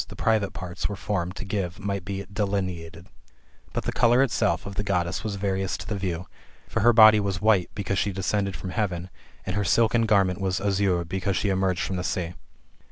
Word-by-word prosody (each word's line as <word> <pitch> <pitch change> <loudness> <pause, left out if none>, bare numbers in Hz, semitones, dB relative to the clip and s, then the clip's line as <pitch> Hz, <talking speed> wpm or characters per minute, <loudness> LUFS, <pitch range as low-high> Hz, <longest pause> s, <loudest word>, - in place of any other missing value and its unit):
e, - - -6
the - - -10
private 110 -3 +1
parts] 90 +1 -4
were 105 - -4
formed 95 -2 -2
to - - -6
give 95 -3 -3
might 100 -2 -3
be 100 +1 -5
delineated, 95 -5 -3 0.7
fiut - - -2
the - - -1
colour 120 +2 +4
itself 115 -6 0
of 100 - -6
the 100 - -2
Goddess 95 -2 -1
was 105 -2 -3
various 95 -1 -1
to - - -9
the 105 - -2
view. 90 -3 -3 0.4
For - - -2
her 120 +3 +6
body 110 -2 +8
was 100 -3 -1
white, 105 -4 +3
because 100 -2 -1
she 100 - 0
descended 95 0 -1
from 90 +1 -6
heaven, 90 -4 -2 0.3
and 95 - -3
her 105 - +1
silken 115 +2 +3
garment 95 -3 +2
was 95 -1 0
azure, 95 -3 +1
because 95 +2 -2
she 100 - 0
emerged 95 -1 +1
from 95 - -2
the 90 - -2
sea. 90 -2 -2
95 Hz, 210 wpm, -25 LUFS, 90-105 Hz, 0.7 s, body